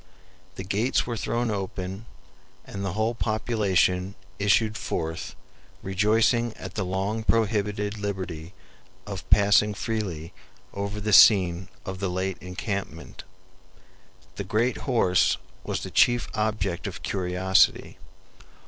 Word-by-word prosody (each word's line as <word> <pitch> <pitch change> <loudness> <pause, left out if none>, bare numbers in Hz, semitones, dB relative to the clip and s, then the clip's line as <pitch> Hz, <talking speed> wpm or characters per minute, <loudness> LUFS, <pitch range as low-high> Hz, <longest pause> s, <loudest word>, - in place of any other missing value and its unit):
The 95 - -6
gates 105 +7 0
were 120 - -3
thrown 120 +1 -1
open, 95 +1 -5 0.6
and 100 0 -6
the 95 -3 -2
whole 110 +3 0
population 100 -5 0 0.2
issued 105 +2 +2
forth 80 - -4 0.5
rejoicing 110 +4 +2
at - - -8
the 105 - -2
long 95 +4 -2
prohibited 105 -2 0
liberty 95 -4 -5 0.5
of 100 -2 -7
passing 100 0 +4
freely 95 -9 -4 0.4
over 100 +1 -4
the 105 0 -1
scene 95 -4 +6 0.2
of 95 -1 -5
the 100 -1 -1
late 95 +1 -2
encampment. 95 +2 -5 1.1
The 100 - -3
great 110 +6 0
HORSE 95 -8 +3 0.3
was - - -3
the - - -6
chief 120 0 +3
object 105 -5 -1
of - - -7
curiosity. 95 0 +1
100 Hz, 115 wpm, -26 LUFS, 95-110 Hz, 1.1 s, scene